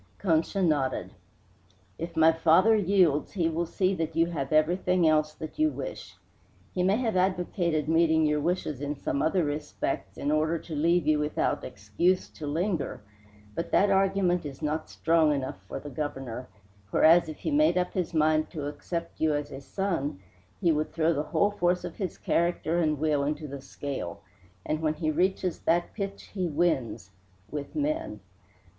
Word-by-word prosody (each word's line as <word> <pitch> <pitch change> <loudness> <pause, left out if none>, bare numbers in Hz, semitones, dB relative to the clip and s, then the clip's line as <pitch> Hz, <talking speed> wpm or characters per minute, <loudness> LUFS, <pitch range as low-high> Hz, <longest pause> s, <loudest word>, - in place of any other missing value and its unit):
Concha 180 +2 +1
nodded. 145 -6 0 0.9
"If 165 0 -6
my 160 0 +7
father 165 +7 +4
yields 185 -7 +2
he 175 -5 +1
will 165 +1 -2
see 185 +2 +1
that 165 -3 -3
you 165 0 +4
have 140 -5 -3
everything 175 +3 +3
else 155 -1 +2
that 160 - -8
you 310 0 +4
wish. - - -7 0.6
He 180 - -1
may 190 +3 +3
have 225 -3 -1
advocated 180 -4 0
meeting 160 -1 +3
your 150 0 +2
wishes 155 -4 -1
in 145 0 -3 0.2
other 165 +4 +2
respects 145 -9 -3
in 145 - -1
order 155 +2 +1
to 160 0 -7
leave 170 +2 +2
you 155 0 +3
without 150 0 -1
excuse 105 - 0
to 150 - -8
linger, 165 - -2 0.5
but 165 - -4
that 200 0 +4
argument 190 -2 +2
is 145 0 -8
not 155 +1 -2
strong 160 -2 +3
enough 130 -9 -4
for - - -5
the 145 - -9
Governor, 130 -3 -5 0.4
whereas 165 +6 +5
if 155 - -7
he - - -3
made 300 -6 +4
up 180 0 0
his 180 -3 -1
mind 155 -1 +2
to 150 -5 -5
accept 170 +3 -5
you 155 -1 +3
as 145 0 -3
a 135 - -7
son 165 - -2 0.4
he 175 -4 +3
would 155 0 -1
throw 165 0 +2
the 145 - -1
whole 205 - +2
force 180 -2 +1
of - - -7
his 190 -5 -4
character 170 0 0
and 155 -3 +1
will 150 -1 +1
into 150 +1 -2
the 140 -1 -7
scale; 130 -11 -6 0.4
and 155 +1 -1
when 155 -1 0
he 155 -2 -1
reaches 185 +2 0
that 170 +1 +1
pitch 200 -1 -6
he 185 -3 -1
wins 130 - -1 0.4
with 145 -2 -6
men. 310 +2 -2
160 Hz, 175 wpm, -28 LUFS, 150-180 Hz, 0.9 s, my